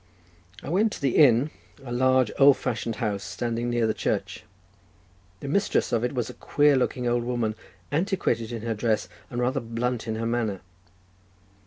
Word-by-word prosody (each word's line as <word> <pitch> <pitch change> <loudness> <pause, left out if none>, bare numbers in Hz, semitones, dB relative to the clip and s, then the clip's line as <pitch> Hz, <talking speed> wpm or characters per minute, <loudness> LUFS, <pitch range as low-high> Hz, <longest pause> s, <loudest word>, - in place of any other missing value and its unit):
I - - -6
went 205 +6 +2
to - - -7
the 135 -3 +1
inn, 140 0 +5 0.3
a 120 - -7
large 130 -1 +3
old 140 0 +7
fashioned 115 -2 -3
house, 105 -3 -2
standing 115 +5 -3
near 120 -1 +1
the 110 - +1
church; 105 - -3 1.0
the - - -6
mistress 195 +8 +1
of 115 -1 +1
it 125 +2 -1
was 120 -3 -1
a - - -8
queer 145 -1 +3
looking 125 -1 0
old 120 0 +1
woman, 120 -3 -1 0.4
antiquated 155 - 0
in 115 -2 -5
her 115 -1 -1
dress, 110 0 0 0.2
and 120 - -4
rather 130 +3 +1
blunt 115 0 -3
in 110 - -2
her 115 +1 -3
manner. 115 -5 -1
120 Hz, 175 wpm, -26 LUFS, 115-130 Hz, 1.0 s, old